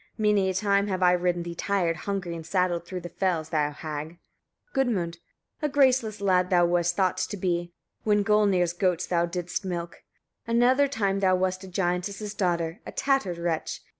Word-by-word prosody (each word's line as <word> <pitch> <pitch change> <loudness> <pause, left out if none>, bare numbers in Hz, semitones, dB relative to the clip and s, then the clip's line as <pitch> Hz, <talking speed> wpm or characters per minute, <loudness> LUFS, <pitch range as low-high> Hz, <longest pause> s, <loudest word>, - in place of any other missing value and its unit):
Many 210 -3 +2
a 190 - -2
time 200 +1 +2
have 185 -2 -1
I 180 - +6
ridden 175 -1 +1
thee 170 0 -5
tired, 175 -2 0
hungry 185 -2 -4
and 165 - -7
saddled, 175 0 0
through 185 0 -5
the 175 - -6
fells, 175 -3 -1
thou 150 -2 +1
hag! 155 +2 -6 0.6
Gudmund. 185 -11 0 0.4
42. - - -2
A - - -5
graceless 260 -7 +2
lad 185 -2 +2
thou 175 -2 +4
wast 175 0 +1
thought 185 -2 +1
to 205 - -2
be, 175 -2 -1 0.3
when 210 -1 +3
Gulnir's 200 -5 +3
goats 180 -1 0
thou 170 -1 +1
didst 175 +1 -3
milk. 175 -2 -5 0.5
Another 245 +4 +4
time 200 -7 0
thou 185 -1 +3
wast 185 +1 -1
a - - -10
giantess's 190 +3 -2
daughter, 170 -4 -1
a - - -8
tattered 265 -11 0
wretch. 170 -2 -2
180 Hz, 180 wpm, -26 LUFS, 175-200 Hz, 0.6 s, I